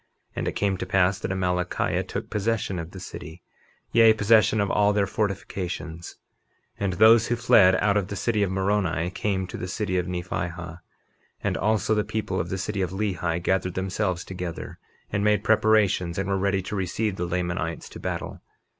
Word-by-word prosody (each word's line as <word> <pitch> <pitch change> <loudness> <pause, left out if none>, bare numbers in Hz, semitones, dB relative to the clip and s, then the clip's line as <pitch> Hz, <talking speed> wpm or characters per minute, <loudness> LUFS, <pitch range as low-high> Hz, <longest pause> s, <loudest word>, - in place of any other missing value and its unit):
And - - -2
it - - -1
came 100 -2 0
to - - -4
pass 95 0 +2
that - - -4
Amalickiah 90 -1 0
took - - -5
possession 105 -3 -1
of 80 0 -6
the 95 - -10
city, 90 -1 -9 0.5
yea, 115 -1 +7
possession 110 0 +4
of 100 -1 +1
all 105 0 +3
their 100 -1 +2
fortifications. 90 -5 -4 0.6
51:24 - - -3
And 95 -2 0
those 110 +3 +6
who 120 - +1
fled 100 -6 +5
out 105 -1 +2
of 100 -2 0
the 100 - -5
city 110 +2 0
of 100 - +2
Moroni 95 -3 0
came 95 0 -1
to 90 - -7
the 90 - -5
city 95 -1 -1
of 90 - -3
Nephihah; 90 -1 -4 0.6
and - - 0
also 110 0 +1
the 105 -1 +2
people 105 -4 -3
of 85 - -3
the 95 - -2
city 100 +1 -2
of 90 - 0
Lehi 90 -4 -1
gathered 95 -1 0
themselves 95 -1 -1
together, 90 -3 -6 0.3
and 100 - 0
made 105 -1 +2
preparations 105 -6 +3
and 95 0 -1
were 100 - +1
ready 100 -1 0
to 105 - -5
receive 95 +2 -1
the 90 - -2
Lamanites 85 -2 -2
to - - -10
battle. - - -5
95 Hz, 190 wpm, -25 LUFS, 90-105 Hz, 0.6 s, yea